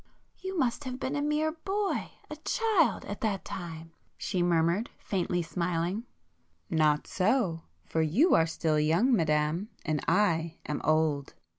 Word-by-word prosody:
"You 380 0 -4
must 265 0 0
have 255 0 -4
been 275 +1 -2
a 290 - 0
mere 300 +1 +1
boy—a 390 +5 -3
child,—at 450 - +1
that 210 -5 -1
time!" 165 -2 -7 0.3
she 180 - -1
murmured 175 +5 +2
faintly 180 -2 -1
smiling. 175 +5 -2 0.7
"Not 150 -2 +3
so!—for 165 - -1
you 205 - +4
are 165 - +5
still 160 -1 0
young, 170 - +3
Madame, 155 +3 +1 0.2
and 155 -2 -1
I 170 -5 +2
am 150 - -3
old. 155 -2 +1
175 Hz, 130 wpm, -29 LUFS, 160-250 Hz, 0.7 s, are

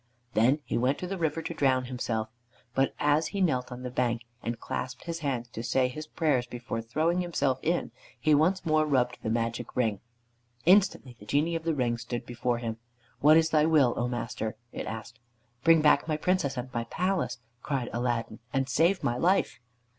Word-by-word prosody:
Then 125 +7 +3
he - - -1
went 130 +4 +2
to - - -5
the 190 +1 -4
river 160 0 -1
to 170 - -4
drown 130 -4 +2
himself; 120 -3 -2 0.5
but 135 +1 +1
as 150 +2 +3
he 200 - -4
knelt 130 -9 +1
on 125 +1 -7
the 125 - -4
bank 120 -1 0 0.2
and 115 0 -3
clasped 125 +2 -5
his 170 0 -4
hands 130 -6 -2
to 115 - -6
say 125 +2 +2
his 155 +4 -7
prayers 145 -7 +1
before 120 -1 -4
throwing 160 +10 0
himself 140 -7 0
in, 170 +2 0 0.3
he 155 - +3
once 175 +6 +3
more 155 -1 +3
rubbed 125 -4 +1
the - - -2
Magic 115 +1 -2
Ring. 110 -5 +1 0.7
Instantly 180 -9 +4
the 105 - -13
Genie 155 +4 +1
of 165 0 -4
the 165 -2 +1
Ring 120 -3 0
stood 120 +1 -5
before 120 0 -1
him. 115 -2 -4 0.4
"What 155 +2 +7
is 160 0 +3
thy 155 0 +4
will, 145 -7 +4
O 120 - 0
master?" 115 -2 -3
it - - -5
asked. 110 +2 -7 0.4
"Bring 165 -2 +6
back 150 0 +4
my 155 -2 0
Princess 155 -5 0
and 125 +1 -5
my 115 0 -2
palace," 185 -4 -1 0.2
cried 135 -5 -2
Aladdin, 120 -2 -2
"and 135 -1 0
save 170 +7 +2
my 120 - 0
life." 180 +8 +2
130 Hz, 195 wpm, -28 LUFS, 120-160 Hz, 0.7 s, What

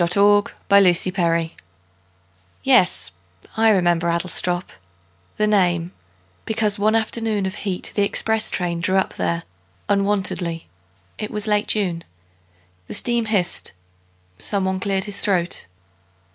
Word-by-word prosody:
Edward 205 +4 +3 0.2
Thomas 190 -3 +5
Adlestrop 170 -3 0 1.1
YES, 230 - +3 0.4
I 225 0 +4
remember 175 -4 +2
Adlestrop 175 +1 +1 0.7
The 215 - +2
name 180 -5 +1 0.5
because 215 -2 +1
one 215 +2 +2
afternoon 220 -2 0
Of 190 - -3
heat 195 -3 -3
the 205 - 0
express 220 +2 +1
train 170 -1 -2
drew 185 +3 0
up 190 - 0
there 170 0 -2 0.5
Unwontedly. 195 -4 -1 0.5
It 215 - -4
was 210 -1 -3
late 210 -1 +1
June. 180 -6 -1 0.8
The - - -5
steam 235 -1 +1
hissed. 195 -5 0 0.7
Someone 190 -2 0
cleared 195 0 -1
his 205 -1 -5
throat. 180 - 0
195 Hz, 115 wpm, -21 LUFS, 175-210 Hz, 1.1 s, Thomas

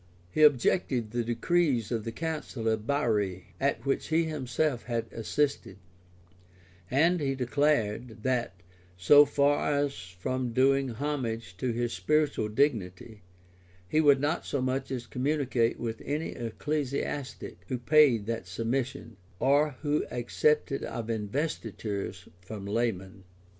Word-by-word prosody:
] 90 0 -30
He 155 - 0
objected 130 - +3
the 120 0 -1
decrees 120 0 +1
of 115 -3 -2
the 115 - -3
council 150 -6 -4
of 110 0 0
Bari, 105 -10 0
at 140 +1 0
which 135 - 0
he 160 +1 +2
himself 145 -3 -1
had 115 -2 -2
assisted; 140 +5 -1 1.1
and 165 +7 +3
he 135 -2 -1
declared, 125 -4 0
that, 125 -5 0 0.4
so 145 +12 +7
far 145 0 +2
from 120 +3 -4
doing 135 +2 +3
homage 115 - -3
for 130 - -3
his 120 0 -1
spiritual 135 - +1
dignity, 110 -4 -1 0.7
he 155 +11 +2
would 145 -3 +5
not 150 +4 0
so 140 - -2
much 130 +1 -1
as 125 -2 -4
communicate 130 -3 0
with 115 -1 -4
any 150 +3 -2
ecclesiastic 140 - -4
who 130 - -2
paid 125 -4 +4
that 115 -4 -4
submission, 115 +2 -3 0.2
or 145 +4 +3
who 150 0 +1
accepted 135 +4 0
of 115 -1 -4
investitures 105 - -3
from 100 +2 -8
laymen. 100 -3 -2
125 Hz, 125 wpm, -29 LUFS, 110-145 Hz, 1.1 s, so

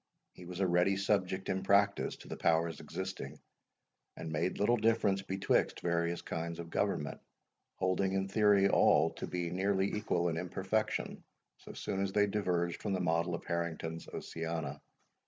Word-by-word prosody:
He 90 - -12
was 90 +1 -7
a - - +4
ready 90 +2 +3
subject 95 -1 0
in 95 - 0
practice 100 +1 +2
to - - -13
the - - -5
powers 80 -1 +1
existing, 95 -6 -6 0.8
and 80 - -5
made 80 +4 -1
little 120 +4 +3
difference 110 -3 +2
betwixt 95 0 0
various 85 0 0
kinds 85 0 -4
of 85 -1 -7
government, 75 -3 -1 0.5
holding 95 +1 +1
in 95 0 0
theory 100 -1 +4
all - - +4
to - - -6
be 85 -1 -3
nearly 95 +1 +1
equal 90 -5 0
in 80 - -2
imperfection, 95 +5 -2 0.3
so - - -11
soon 95 - -3
as 95 -1 -1
they 105 0 +4
diverged 90 -4 -1
from 100 - -1
the 95 - 0
model 85 0 +1
of - - -8
Harrington's 85 -1 -3
Oceana. 80 -4 -4
95 Hz, 160 wpm, -33 LUFS, 85-100 Hz, 0.8 s, a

